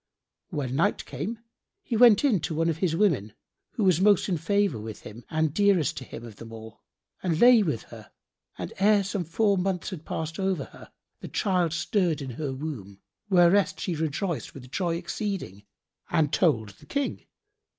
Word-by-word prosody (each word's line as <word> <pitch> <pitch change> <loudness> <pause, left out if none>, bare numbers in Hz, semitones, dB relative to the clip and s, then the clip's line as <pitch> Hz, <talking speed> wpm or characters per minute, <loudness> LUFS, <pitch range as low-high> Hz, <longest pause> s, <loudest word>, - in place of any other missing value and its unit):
When 135 -3 -3
night 160 - +1
came, 165 - -4 0.5
he 235 - -3
went 235 0 +7
in 230 -10 +3
to 155 - -3
one 165 +1 +1
of 160 - -1
his 170 -2 0
women, 150 - +1 0.4
who 220 - -1
was 185 -3 +3
most 205 -1 +4
in 180 - +1
favour 200 - +1
with 110 0 -8
him 115 +3 -11
and 155 -2 0
dearest 200 -6 +3
to - - -5
him 120 -2 -9
of 110 -3 -11
them 115 0 -10
all, 110 0 -11 0.4
and 165 -4 0
lay 245 -2 +7
with 155 - -1
her: 110 -3 -13 0.5
and - - -6
ere 205 +1 +4
some 195 -1 -2
four 200 +4 +1
months 185 0 -2
had 170 -5 -7
passed 160 +3 -4
over 190 -6 0
her, - - -15 0.3
the - - -8
child 180 -5 0
stirred 170 -2 0
in 135 -3 -5
her 140 +3 -4
womb, 130 -9 -6 0.3
whereat 185 +1 +4
she 180 - -2
rejoiced 160 +2 -3
with 130 -2 -11
joy 175 -3 -1
exceeding 170 - -4 0.4
and 150 -2 +1
told 120 - +2
the 95 - -17
King. 280 -1 -2
165 Hz, 180 wpm, -27 LUFS, 135-195 Hz, 0.5 s, went